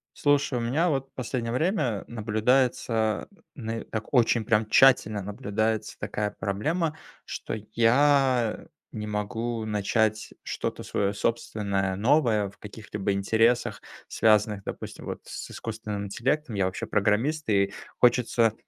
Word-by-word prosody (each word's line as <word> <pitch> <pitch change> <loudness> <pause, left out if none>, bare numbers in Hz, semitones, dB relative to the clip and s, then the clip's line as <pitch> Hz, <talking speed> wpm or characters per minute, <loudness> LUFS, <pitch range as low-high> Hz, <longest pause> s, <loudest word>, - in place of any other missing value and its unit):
Слушай, 145 -3 +2
у - - -2
меня, 145 +10 +1
вот, 135 -3 -1
в - - -49
последнее 120 -1 -3
время 130 - 0
наблюдается, 110 0 +1 0.3
нэ 115 -4 -4
так, 110 +3 -6
очень 115 -3 +3
прям 105 0 +2
тщательно, 110 -5 +5
наблюдается 105 +2 -2
такая 105 -1 -2
проблема, 150 - -1 0.3
что - - -5 0.2
я, 125 0 +4
э, - - -16 0.2
не 105 -1 -5
могу 110 +2 -3
начать 110 +1 0
что-то - - -4
свое 100 0 -1
собственное, 100 -4 -1
новое, 110 -3 +2
в - - -25
каких-либо 105 -1 -4
интересах, 115 +5 +2 0.3
связанных, 105 -2 +2
допустим, - - -7
вот, - - -5
с - - -7
искусственным 105 -2 -5
интеллектом. 130 +7 -1
Я, 100 -2 +1
вообще, 95 0 -3
программист, 115 +9 +1
и 100 -1 +2 0.3
хочется 120 -2 +3
110 Hz, 130 wpm, -27 LUFS, 105-125 Hz, 0.3 s, тщательно